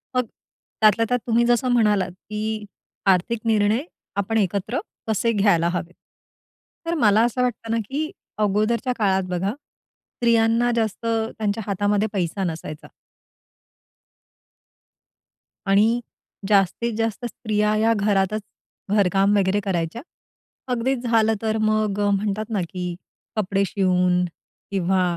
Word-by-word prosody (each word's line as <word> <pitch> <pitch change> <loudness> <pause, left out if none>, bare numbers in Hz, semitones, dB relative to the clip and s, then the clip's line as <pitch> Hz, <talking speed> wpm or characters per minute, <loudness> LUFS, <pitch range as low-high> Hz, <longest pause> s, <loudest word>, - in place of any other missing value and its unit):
मग 250 -1 +2 0.6
त्यातल्या 215 +1 +5
त्यात 245 - +2
तुम्ही 235 +1 +3
जसं 240 +2 +2
म्हणालात, 210 -6 +2 0.2
की 215 0 -3 0.4
आर्थिक 195 +4 +2
निर्णय 220 +3 +2 0.3
आपण 210 +3 0
एकत्र 200 +3 0 0.3
कसे 225 +2 +1
घ्यायला 195 -6 +3
हवेत. 175 0 -4 0.9
तर 335 - -1
मला 220 -6 +4
असं 240 +1 -1
वाटतं 230 -2 -2
ना, 230 - +1
की 310 +3 -2 0.3
अगोदरच्या 215 +4 +1
काळात 190 -4 +2
बघा 180 +2 -1
स्त्रियांना 235 -4 -1
जास्त 225 -1 -1
त्यांच्या 220 -1 -1
हातामध्ये 205 +2 +1
पैसा 190 0 -1
नसायचा. 160 -3 -5 2.8
आणि 200 +2 +5 0.6
जास्तीत 210 +4 +2
जास्त 225 +1 -2
स्त्रिया 210 -2 0
ह्या 220 +1 +3
घरातच 205 0 +1 0.6
घरकाम 195 +1 +3
वगैरे 195 +1 +2
करायच्या. 175 +4 -1 0.7
अगदीच 245 +1 0
झालं 225 -1 +3
तर 220 0 0
मग 215 -2 +1
अ, 205 0 +2
म्हणतात 205 +1 -1
ना, 210 -4 0
की 180 -2 -4 0.4
कपडे 200 -2 +1
शिवून 180 -2 +2 0.5
किंवा 190 -1 +1
210 Hz, 115 wpm, -23 LUFS, 195-230 Hz, 2.8 s, त्यातल्या